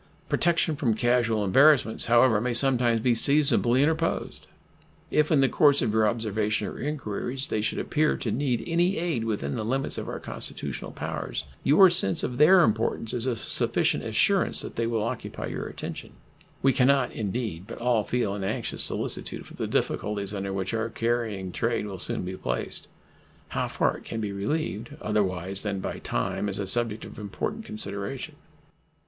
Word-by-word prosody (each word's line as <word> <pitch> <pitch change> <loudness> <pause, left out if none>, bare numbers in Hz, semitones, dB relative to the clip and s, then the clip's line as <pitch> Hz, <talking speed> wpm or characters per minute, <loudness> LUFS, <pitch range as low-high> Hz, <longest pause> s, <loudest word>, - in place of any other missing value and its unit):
Protection 170 -2 +1
from 125 -6 0
casual 115 -3 +1
embarrassments, 130 +3 +4
however, 120 -2 +4
may 120 0 -1
sometimes 120 -3 +3
be 125 +1 +3
seasonably 135 0 +4
interposed. 160 +2 -1 0.6
If 150 +1 +2
in 145 -3 +4
the 135 - +4
course 145 +1 +4
of 105 - 0
your 110 -1 +3
observations 105 -2 -1
or - - -10
inquiries 135 -2 -3
they 110 - -2
should 110 - -2
appear 155 0 +1
to 115 - -3
need 125 -3 -1
any 175 +6 +1
aid 160 -9 -1
within 85 -11 -2
the - - -2
limits 135 +5 -1
of - - -6
our - - -5
constitutional - - -5
powers, - - -4 0.2
your 170 +8 +7
sense 95 - +2
of 125 +1 -3
their 180 +5 +7
importance 110 0 0
is 125 +1 -1
a 125 - 0
sufficient - - +1
assurance - - +2
they 115 0 -3
will 115 -2 -1
occupy 115 +1 -4
your - - -5
attention. - - -7 0.5
We 135 0 +4
can 125 +1 +3
not, 135 -2 +3
indeed, 105 -4 -4
but 115 - -8
all 120 -2 +1
feel 105 -1 -1
an 100 -1 -4
anxious 95 - -2
solicitude - - 0
for - - -14
the - - -4
difficulties 100 -1 -1
under 100 -1 -3
which 95 +2 -3
our 115 0 -1
carrying 115 -5 -2
trade 115 +2 -1
will 95 -3 -7
soon - - -2
be 95 +1 -5
placed. - - -3 0.6
How - - -2
far - - 0
it - - -16
can 115 - -5
be 105 -2 -3
relieved, 110 +2 -3
otherwise 95 -3 -1
than 100 -2 -2
by - - -5
time, - - -2
is 95 - -1
a 100 - -2
subject 115 +2 +3
of - - -11
important 160 - -4
consideration. 135 - -4
115 Hz, 175 wpm, -26 LUFS, 105-135 Hz, 0.6 s, your